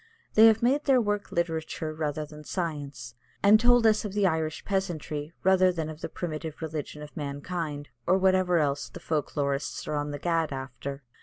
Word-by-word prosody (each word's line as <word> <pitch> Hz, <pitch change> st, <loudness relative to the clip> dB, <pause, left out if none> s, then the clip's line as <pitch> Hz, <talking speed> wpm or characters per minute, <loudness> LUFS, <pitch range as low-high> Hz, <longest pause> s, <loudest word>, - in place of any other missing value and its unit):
They 220 Hz, +1 st, +8 dB
have 225 Hz, 0 st, +4 dB
made 275 Hz, +5 st, +2 dB
their 270 Hz, -3 st, +5 dB
work 205 Hz, -3 st, -1 dB
literature 160 Hz, -2 st, -2 dB
rather 155 Hz, -1 st, -2 dB
than 150 Hz, 0 st, -12 dB
science, 145 Hz, -8 st, -4 dB, 0.3 s
and 205 Hz, +2 st, +7 dB
told 245 Hz, 0 st, +5 dB
us 215 Hz, -1 st, +4 dB
of 205 Hz, -3 st, -5 dB
the 205 Hz, -1 st, +2 dB
Irish 160 Hz, -3 st, -1 dB
peasantry 160 Hz, -6 st, -2 dB
rather 185 Hz, 0 st, +5 dB
than 160 Hz, -3 st, -3 dB
of 155 Hz, 0 st, -11 dB
the -, -, -4 dB
primitive 160 Hz, -2 st, -5 dB
religion 150 Hz, -2 st, -5 dB
of 150 Hz, -, -11 dB
mankind, 145 Hz, 0 st, -4 dB, 0.2 s
or 185 Hz, +2 st, +5 dB
whatever 185 Hz, -2 st, +3 dB
else 140 Hz, -3 st, 0 dB
the -, -, -10 dB
folk 155 Hz, -3 st, -2 dB
lorists 140 Hz, 0 st, -1 dB
are -, -, -2 dB
on 145 Hz, 0 st, -2 dB
the 145 Hz, -, -4 dB
gad 165 Hz, 0 st, 0 dB
after. 135 Hz, +1 st, -6 dB
160 Hz, 185 wpm, -28 LUFS, 145-190 Hz, 0.3 s, They